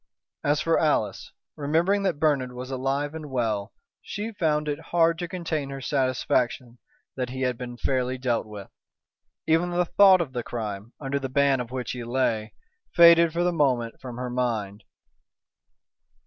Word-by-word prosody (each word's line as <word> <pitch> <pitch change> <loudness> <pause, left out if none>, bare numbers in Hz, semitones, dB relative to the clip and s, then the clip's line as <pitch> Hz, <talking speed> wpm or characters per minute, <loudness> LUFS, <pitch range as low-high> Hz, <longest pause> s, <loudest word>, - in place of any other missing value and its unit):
As 145 +1 +2
for 165 0 +2
Alice, 110 - 0 0.2
remembering 165 +8 +1
that 190 -6 0
Bernard 140 -5 +1
was 125 +1 -7
alive 135 +3 -1
and 155 -2 -7
well, 110 -5 -1 0.3
she 210 +2 -5
found 155 -7 0
it 145 0 -2
hard 165 -1 +3
to 175 - -3
contain 165 -5 -3
her 135 0 -6
satisfaction 130 -2 -1 0.4
that 125 -2 -3
he 130 +1 -6
had 125 -1 0
been 120 0 -7
fairly 130 0 -1
dealt 120 -3 -1
with. 105 -2 -10 0.7
Even 165 +2 +2
the 175 0 +1
thought 190 +1 +6
of 150 -6 -3
the 120 - -2
crime, 110 -2 -5
under 140 0 -2
the 135 -1 -4
ban 140 0 +3
of 120 -2 -4
which 125 -2 -4
he 125 -1 -5
lay, 115 -3 -1 0.4
faded 170 -1 +7
for 170 +2 0
the 175 0 +1
moment 125 -7 0
from 125 -2 -7
her 125 0 -4
mind. 110 -5 -2
135 Hz, 165 wpm, -25 LUFS, 125-160 Hz, 0.7 s, faded